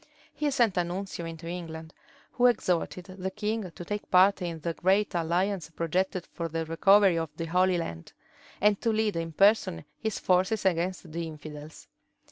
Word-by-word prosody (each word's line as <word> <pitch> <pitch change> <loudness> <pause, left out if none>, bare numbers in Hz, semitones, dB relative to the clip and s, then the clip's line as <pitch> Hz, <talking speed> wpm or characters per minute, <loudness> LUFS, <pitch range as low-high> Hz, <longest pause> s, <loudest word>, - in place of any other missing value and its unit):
He 300 -1 -1
sent 235 -8 +2
a 175 - +3
nuncio 175 -1 -5
into 165 0 -8
England, 165 -2 -6 0.4
who 250 0 +4
exhorted 180 -5 0
the 190 +1 -2
king 210 0 -3
to 175 +1 -10
take 205 +2 -4
part 190 +1 +5
in 170 -2 -3
the 170 +1 -2
great 195 +5 +2
alliance 175 +1 0
projected 175 +3 -1
for 170 - -3
the 165 0 -3
recovery 190 +2 +4
of 165 -1 -3
the 165 - -3
Holy 180 +2 +2
Land, 85 - -5 0.5
and 205 -1 +3
to 230 - +1
lead 220 -2 0
in 165 0 -3
person 195 - +3
his 220 -2 -2
forces 190 +4 +1
against 180 -1 0
the 165 +1 -3
infidels. 150 -1 -10
180 Hz, 170 wpm, -28 LUFS, 165-200 Hz, 0.5 s, part